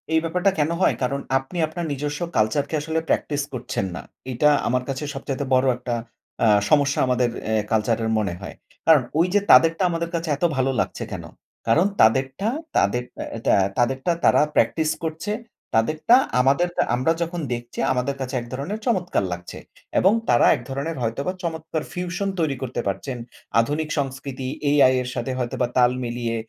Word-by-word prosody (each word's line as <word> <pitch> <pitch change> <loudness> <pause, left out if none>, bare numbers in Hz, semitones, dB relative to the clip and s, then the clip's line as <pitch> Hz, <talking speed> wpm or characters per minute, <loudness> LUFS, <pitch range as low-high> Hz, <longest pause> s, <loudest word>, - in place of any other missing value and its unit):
এই 160 - +5
ব্যাপারটা 180 +4 +1
কেন 150 +1 +2
হয়? - - +4
কারণ 140 +2 0 0.2
আপনি 135 +7 -6
আপনার 170 +2 -5
নিজস্ব 145 +1 -3 0.2
কালচার 110 +6 +2
কে - - -2
আসলে 160 +2 -1
প্র্যাকটিস 145 -1 0
করছেন 120 -5 -3
না। - - -5 0.3
এটা 150 +5 +4 0.2
আমার 125 +1 +1
কাছে 135 +2 -3
সবচাইতে 135 0 -4
বড় 130 +1 +3
একটা 125 -1 -3 0.5
আ - - +5 0.2
সমস্যা 145 -2 +3
আমাদের 125 -1 +2 0.2
এ - - +1 0.2
কালচার 110 +1 +2
এর 110 - 0
মনে 100 -5 -1
হয়। 95 - -8 0.3
কারণ 155 -5 +6 0.2
ওই 170 - +4
যে 205 - +5
তাদেরটা 165 +7 +6
আমাদের 170 0 -2
কাছে 165 -1 -2
এত - - -7
ভালো 135 0 +2
লাগছে - - -2
কেন? - - -5 0.4
কারণ 155 +11 +4 0.2
তাদেরটা 130 - +3 0.3
তাদের 120 +5 +2 0.2
অ্যা 115 - -6
তে - - +4 0.3
তাদেরটা 130 +6 +1
তারা - - +5
প্র্যাকটিস 160 -1 +2
করছে 160 +5 -3 0.4
তাদেরটা 155 - +4 0.3
আমাদের 140 +7 +3 0.3
আমরা 130 +6 +1
যখন 170 +1 -2
দেখছি 120 0 -7
আমাদের 130 +2 -1
কাছে 130 0 -3
এক 120 - -3
ধরনের 145 +12 -4
চমৎকার 185 - +1
লাগছে 90 0 -8 0.4
এবং 190 +3 +5 0.2
তারা 120 - +5
এক - - -7
ধরণের 140 +4 -3
হয়তোবা 115 +10 -1
চমৎকার 160 -2 -3
ফিউশন 180 +3 -2
তৈরি 155 -4 +1
করতে 130 -1 -3
পারছেন। 125 +6 -3 0.4
আধুনিক 150 +5 -2
সংস্কৃতি 135 -1 -3 0.2
AI 140 -3 +5
এর 125 - -5
সাথে 130 - -2
হয়তোবা 125 0 -1
তাল 125 -1 +5
মিলিয়ে 120 -1 -2
140 Hz, 170 wpm, -23 LUFS, 125-160 Hz, 0.5 s, কারণ